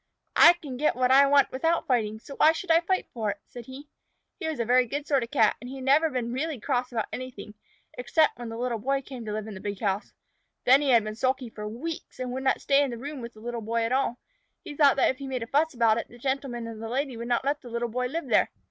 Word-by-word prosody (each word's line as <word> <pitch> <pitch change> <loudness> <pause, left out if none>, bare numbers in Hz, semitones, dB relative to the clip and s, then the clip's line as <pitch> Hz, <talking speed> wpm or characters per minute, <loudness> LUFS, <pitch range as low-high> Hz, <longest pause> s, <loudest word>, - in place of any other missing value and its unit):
"I - - +9
can 290 -7 -8
get 300 +3 +1
what 255 0 +2
I 275 +1 +7
want 280 -1 +4
without 325 +6 0
fighting 220 -4 0
for 220 - -20
it, - - -28
so 280 - -9
why 315 - +6
should 335 +1 -3
I 325 - +6
fight?" 370 +2 -1 0.4
said 240 -2 -11
he. 270 +3 -10 0.5
He - - -3
was 315 -5 -3
a 235 - 0
very 250 +1 +4
good 285 +5 -4
sort 280 -3 +2
of 235 - -5
Cat, 225 -7 +3
and 245 - -8
had 265 0 -7
never 295 +5 +4
been 245 -4 -3
really 290 +1 -2
cross 250 +1 -1
about 225 -3 -1
anything 245 -5 -7 0.5
except 295 +3 +2
when 240 -1 -6
the 225 - -6
Little 240 -1 -2
Boy 275 +4 -1
came 255 -3 -8
to 210 - -4
live 215 0 -3
in 220 - -7
the 190 - -8
big 205 -1 -5
house. 200 -1 -2 0.5
Then 265 +3 +6
he 285 - 0
had 235 -4 +5
been 215 0 -4
sulky 255 +1 -1
for 210 -1 -7
weeks, 265 +10 -6
and 255 -1 -3
would 260 +1 -3
not 265 0 +1
stay 280 0 +3
in 280 - +1
the 240 - -5
room 280 +2 -6
with 235 0 -8
the 215 - -14
Little 240 0 -4
Boy 230 +1 -1
at 225 - -1
all. 260 -2 +1 0.5
He 295 - -8
thought 285 -2 +5
that 275 - +3
if 260 - -10
he 275 0 -7
made 255 -3 -3
enough 230 - -11
fuss 305 +1 +2
about 230 -1 +3
it, - - -6
the 240 - -15
Gentleman 265 -2 -3
and 225 -1 -8
the 225 - -5
Lady 265 +1 -2
would 235 +1 -6
not 240 +2 0
let 285 +1 0
the 245 - -11
Little 235 +1 -2
Boy 250 +2 -2
live 330 +6 -4
there. - - +3
255 Hz, 280 wpm, -27 LUFS, 230-280 Hz, 0.5 s, I